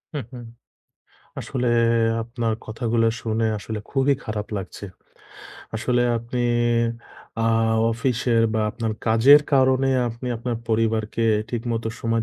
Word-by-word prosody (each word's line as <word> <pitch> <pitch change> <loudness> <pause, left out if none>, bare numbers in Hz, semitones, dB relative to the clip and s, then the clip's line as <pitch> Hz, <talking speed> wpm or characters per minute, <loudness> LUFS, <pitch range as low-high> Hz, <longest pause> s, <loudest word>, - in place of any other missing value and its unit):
হুম, 140 - -3
হুম। 120 -1 -8 1.0
আসলে 125 -2 -2 0.5
আপনার 115 -1 -2
কথাগুলো 115 0 0
শুনে 115 -1 -1
আসলে 110 +1 -5
খুবই 135 +1 +2
খারাপ 105 -2 -4
লাগছে। 95 +1 -7 0.9
আসলে 120 +2 +1 0.2
আপনি 120 +2 -4 1.0
অ্যাঁ 115 0 +2 0.2
অফিসের 115 0 +1
বা 110 - +1
আপনার 115 0 -3
কাজের 125 +7 +7
কারণে 130 0 +3 0.2
আপনি 115 +2 -7
আপনার 120 0 -3
পরিবারকে 110 0 0 0.2
ঠিকমতো 115 -1 -3
সময় 115 0 0
115 Hz, 115 wpm, -23 LUFS, 110-125 Hz, 1.0 s, কাজের